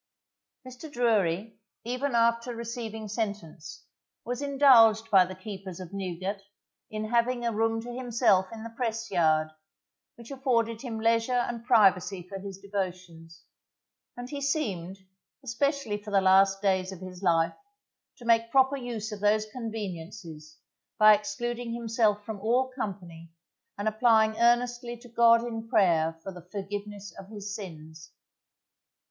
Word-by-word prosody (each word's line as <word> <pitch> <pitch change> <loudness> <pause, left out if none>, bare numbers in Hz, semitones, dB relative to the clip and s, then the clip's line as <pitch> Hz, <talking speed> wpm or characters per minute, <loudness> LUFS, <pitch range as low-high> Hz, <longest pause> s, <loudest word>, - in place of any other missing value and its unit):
Mr. 255 +5 -10
Drury, 220 -5 0 0.2
even 250 +2 -2
after 235 +1 +2
receiving 230 -2 -6
sentence, 200 -7 -5 0.4
was 245 +2 -3
indulged 245 -6 +5
by 190 -3 +7
the 185 +1 -8
keepers 190 -2 -8
of 185 0 -9
Newgate 190 +1 -4 0.5
in 215 0 -4
having 240 +1 +1
a 235 - +1
room 225 +1 0
to 240 0 -7
himself 235 -6 +2
in 225 -1 -8
the 230 - -7
Press 230 -1 -3
Yard, 155 -3 +2 0.7
which 235 +2 -13
afforded 230 -4 0
him 230 -4 -5
leisure 230 +2 +2
and 235 -1 -5
privacy 195 -6 +3
for 195 +1 -7
his 195 -1 -8
devotions; 180 -4 -6 0.7
and 245 +1 -7
he 285 -1 -5
seemed, 200 - -2 0.5
especially 265 -3 -1
for 210 - -9
the 200 -1 +3
last 195 +1 +4
days 190 -1 +1
of 190 - -9
his 185 0 -9
life, 165 -3 +2 0.6
to 240 - -13
make 230 0 +3
proper 265 +2 +3
use 235 -4 -5
of 210 - -6
those 210 +1 +2
conveniences 180 -9 -7 0.4
by 215 0 +8
excluding 240 +2 -3
himself 225 -3 0
from 215 -2 -6
all 245 +5 +1
company 175 -8 -6 0.5
and 205 +1 -3
applying 220 0 +3
earnestly 240 0 +1
to 240 +1 -15
God 230 0 +5
in 225 -1 -5
prayer 165 -6 +2
for 195 - -6
the 180 -1 -11
forgiveness 205 +1 -6
of 195 - -10
his 205 -2 -7
sins. 160 -6 -9
215 Hz, 140 wpm, -28 LUFS, 190-235 Hz, 0.7 s, by